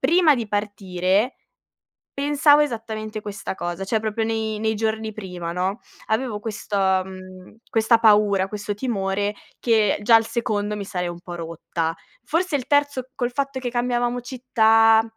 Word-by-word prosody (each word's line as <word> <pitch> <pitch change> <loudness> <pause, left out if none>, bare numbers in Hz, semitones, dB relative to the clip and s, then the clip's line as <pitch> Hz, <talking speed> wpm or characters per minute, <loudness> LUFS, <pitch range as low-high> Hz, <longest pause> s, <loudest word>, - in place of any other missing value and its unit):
prima 320 +2 +5
di 230 -5 -4
partire 205 +1 0 0.8
pensavo 290 +1 +4
esattamente 220 -5 -3
questa 200 -2 -5
cosa. 175 +1 -4
Cioè 220 +3 +1
proprio 220 +1 -2
nei, 220 -1 -2
nei 220 0 +1
giorni 220 0 -1
prima, 180 -5 -6
no. 185 +5 -2 0.3
Avevo 220 -1 -1
questo, 210 -1 -4
mhmm, 185 0 -2
questa 225 +1 +4
paura, 205 -3 +4
questo 205 0 -4
timore 205 -3 -1 0.3
che 220 -5 +2
già 230 +2 +6
al 225 0 +5
secondo 215 -3 -1
mi 200 - -5
sarei 180 -2 -3
un 175 0 -7
po' 175 0 -7
rotta. 165 0 -3 0.3
Forse 330 +4 0
il 260 -3 -2
terzo, 285 -3 +1
col 245 -1 -1
fatto 275 0 -2
che 250 -1 -3
cambiavamo 245 0 0
città 225 -3 +4
220 Hz, 150 wpm, -23 LUFS, 195-245 Hz, 0.8 s, già